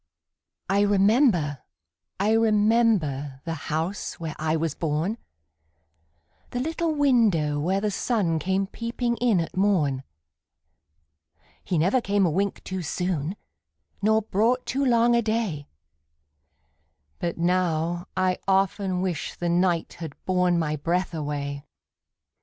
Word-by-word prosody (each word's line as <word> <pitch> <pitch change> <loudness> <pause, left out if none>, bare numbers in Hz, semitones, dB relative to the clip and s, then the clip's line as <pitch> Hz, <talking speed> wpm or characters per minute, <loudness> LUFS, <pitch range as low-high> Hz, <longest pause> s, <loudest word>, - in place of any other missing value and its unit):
I 195 +2 +2
remember, 200 - +3 0.6
I 205 +3 +2
remember, 210 - +2
The 165 - -2 0.2
house 165 +6 -3
where 160 -2 -5
I 155 0 0
was 160 -2 -1
born, 165 +9 -2 1.3
The 245 - -3
little 320 +3 -1
window 215 - +3
where 185 +6 +1
the 210 0 0
sun 195 -7 0
Came 190 +4 0
peeping 235 +3 -3
in 235 -6 +2
at 165 - -4
morn; 175 -9 +2 1.6
He 180 - -1
never 190 +11 +2
came 200 -2 +2
a 170 - +1
wink 195 +4 -1
too 190 -1 -4
soon, 175 0 -2 0.7
Nor 220 +1 +3
brought 230 +5 +1
too 275 +2 -1
long 240 -2 +4
a 235 - +3
day, 215 -10 -2 1.5
But 170 -1 -2
now, 175 -1 0
I 185 -1 +1
often 190 -1 +1
wish 175 -5 -3
the 175 - -2
night 175 -1 +1
Had 160 -4 -6
borne 180 -1 +2
my 155 -2 -1
breath 175 +5 -1
away! 145 -2 -4
185 Hz, 125 wpm, -25 LUFS, 160-215 Hz, 1.6 s, long